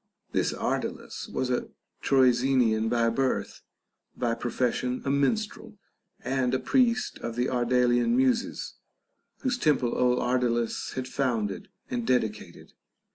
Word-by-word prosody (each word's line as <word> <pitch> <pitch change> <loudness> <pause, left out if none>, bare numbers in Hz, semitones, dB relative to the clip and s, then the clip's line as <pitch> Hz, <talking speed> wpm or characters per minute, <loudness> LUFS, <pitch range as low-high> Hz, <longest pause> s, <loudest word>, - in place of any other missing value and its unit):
This - - +1
Ardalus - - -3
was 130 -1 -1
a 125 - -1 0.3
Troezenian 125 -4 +3
by 115 0 +2
birth, 130 +3 -1 0.6
by 120 -2 0
profes 120 +1 -1
sion 125 0 -3
a 135 - +1
minstrel, 215 +9 -1 0.4
and 130 0 0
a - - 0
priest 250 -2 +1
of 115 -1 -5
the 125 +1 +1
Ardalian 125 - +2
Muses, 255 -2 0 0.6
whose 255 -2 -1
temple 145 - +2
old 125 0 +3
Ardalus 120 -2 0
had 130 -1 -4
founded 115 -8 -2 0.2
and 120 -2 -3
dedicated. 105 -8 -2
125 Hz, 125 wpm, -27 LUFS, 120-135 Hz, 0.6 s, Troezenian